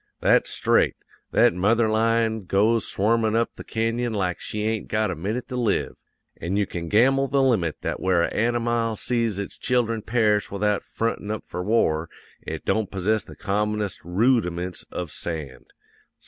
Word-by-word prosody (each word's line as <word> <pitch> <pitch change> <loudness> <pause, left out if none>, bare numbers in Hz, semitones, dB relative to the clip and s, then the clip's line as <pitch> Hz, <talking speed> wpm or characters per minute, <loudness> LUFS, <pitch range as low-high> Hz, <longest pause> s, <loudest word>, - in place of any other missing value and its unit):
That's - - +3
straight; - - +2 0.3
that - - +4
mother 110 +6 +2
lion 110 -1 +1
goes 110 +5 +2
swarmin' 110 +2 +1
up 115 0 +1
the - - -10
canyon 115 +1 -1
like 90 -4 -1
she 105 0 -4
ain't 110 -1 -1
got 110 -2 0
a - - -3
minute 105 +10 -3
to 125 - -4
live. 120 -5 0 0.4
An' 90 +3 -3
you 105 - +2
can 85 -2 -6
gamble 135 +6 +4
the 140 - +1
limit 95 - +1
that - - -3
where 90 -2 +2
a - - -2
anamile 115 0 0
sees 115 -4 0
its 100 -1 -6
children 115 -3 0
perish 105 -2 +1
without 105 +1 0
frontin' 115 -2 -3
up 110 0 -4
for 90 - -5
war, 85 -7 +1 0.3
it - - -6
don't 110 -3 0
possess 105 +3 0
the - - -13
commonest 105 0 -1
roodiments 90 -2 0
of 90 -4 -5
sand. 75 -7 -6
110 Hz, 165 wpm, -24 LUFS, 95-115 Hz, 0.4 s, that